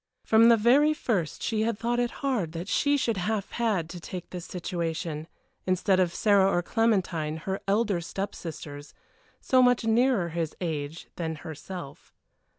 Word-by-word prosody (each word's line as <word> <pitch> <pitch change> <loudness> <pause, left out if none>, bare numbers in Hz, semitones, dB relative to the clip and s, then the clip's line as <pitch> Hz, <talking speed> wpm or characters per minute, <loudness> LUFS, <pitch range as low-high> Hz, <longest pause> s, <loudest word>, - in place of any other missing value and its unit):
From 225 +1 +6
the 230 - +7
very 280 +8 +4
first 190 - -2
she 220 -2 0
had 225 -1 0
thought 240 +2 0
it 240 0 +1 0.2
hard 210 - 0
that 170 +3 -5
she 285 +6 +2
should 230 -6 0
have 205 +2 -2
had 215 -9 0
to 175 - -7
take 180 +1 -8
this 180 -2 -6
situation, 165 -3 -4 0.4
instead 185 +1 +2
of 180 -2 +2
Sarah 200 -2 +4
or 175 - +1
Clementine, 180 -8 0
her 190 +4 -3
elder 200 -3 +1
step 195 +4 -4
sisters, 145 -3 -8 0.5
so 260 -1 +4
much 245 -1 +4
nearer 225 -4 +2
his 165 -1 -3
age 160 -2 -4
than 160 -2 -2
herself. 160 -1 -8
190 Hz, 160 wpm, -27 LUFS, 165-225 Hz, 0.5 s, the